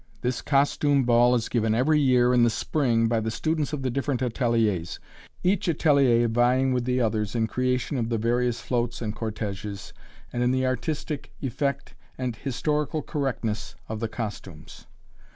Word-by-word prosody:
This 125 Hz, 0 st, -1 dB
costume 140 Hz, 0 st, +2 dB
ball 120 Hz, +1 st, +4 dB
is 115 Hz, -2 st, -1 dB
given 110 Hz, -2 st, +1 dB
every 150 Hz, +6 st, +3 dB
year, 125 Hz, -3 st, +4 dB
in 125 Hz, -, +4 dB
the 120 Hz, -, +5 dB
spring, 115 Hz, -2 st, +1 dB
by 115 Hz, 0 st, +1 dB
the 110 Hz, 0 st, -2 dB
students 155 Hz, +6 st, -1 dB
of 145 Hz, -3 st, -4 dB
the 130 Hz, -, 0 dB
different 135 Hz, 0 st, -1 dB
ateliers, 115 Hz, -8 st, 0 dB, 0.4 s
each 185 Hz, 0 st, +1 dB
atelier 140 Hz, -7 st, +3 dB
vying 125 Hz, +3 st, +2 dB
with 125 Hz, -1 st, -1 dB
the 125 Hz, 0 st, +1 dB
others 110 Hz, -2 st, -1 dB
in 115 Hz, -1 st, +2 dB
creation 125 Hz, +4 st, -1 dB
of 115 Hz, -1 st, -1 dB
the 115 Hz, -, 0 dB
various 120 Hz, +1 st, 0 dB
floats 120 Hz, -1 st, -2 dB
and 110 Hz, -2 st, -4 dB
cortéges, 105 Hz, -3 st, -5 dB, 0.4 s
and 120 Hz, -, -1 dB
in 125 Hz, -, +3 dB
the 130 Hz, 0 st, +1 dB
artistic 145 Hz, +3 st, -3 dB
effect 140 Hz, +2 st, -2 dB, 0.2 s
and 125 Hz, -3 st, -3 dB
historical 150 Hz, +4 st, -1 dB
correctness 120 Hz, -8 st, -3 dB
of 110 Hz, 0 st, -4 dB
the 115 Hz, -, -1 dB
costumes. 105 Hz, -8 st, -7 dB
125 Hz, 165 wpm, -26 LUFS, 115-135 Hz, 0.4 s, the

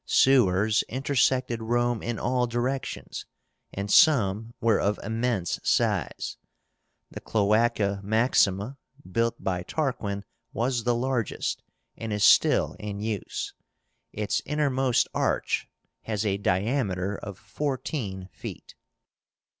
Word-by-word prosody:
SEWERS 110 Hz, -5 st, +4 dB
intersected 130 Hz, -2 st, +1 dB
Rome 120 Hz, 0 st, 0 dB
in 120 Hz, -1 st, -3 dB
all 125 Hz, 0 st, 0 dB
directions, 120 Hz, +3 st, -3 dB, 0.4 s
and 100 Hz, +1 st, -4 dB
some 115 Hz, -, +4 dB
were 115 Hz, -2 st, +3 dB
of 100 Hz, +1 st, 0 dB
immense 110 Hz, -5 st, -1 dB
size. -, -, 0 dB, 0.7 s
The -, -, -8 dB
CLOÁCA 105 Hz, -1 st, +1 dB
MAXIMA, 110 Hz, +1 st, +2 dB, 0.3 s
built 115 Hz, +3 st, 0 dB
by 90 Hz, -2 st, -1 dB
Tarquin, 100 Hz, -, -2 dB, 0.3 s
was 120 Hz, 0 st, -1 dB
the 120 Hz, -1 st, +2 dB
largest, 125 Hz, -2 st, -1 dB, 0.3 s
and 115 Hz, -1 st, -5 dB
is 105 Hz, -1 st, 0 dB
still -, -, +5 dB
in 105 Hz, -1 st, -5 dB
use. 105 Hz, -2 st, -3 dB, 0.6 s
Its 105 Hz, -1 st, -1 dB
innermost 135 Hz, -4 st, +1 dB
arch -, -, 0 dB, 0.4 s
has 110 Hz, -1 st, -2 dB
a 100 Hz, -1 st, +1 dB
diameter 100 Hz, -1 st, 0 dB
of 100 Hz, -2 st, -7 dB
fourteen 110 Hz, -, -4 dB
feet. -, -, -9 dB
115 Hz, 105 wpm, -27 LUFS, 100-125 Hz, 0.7 s, still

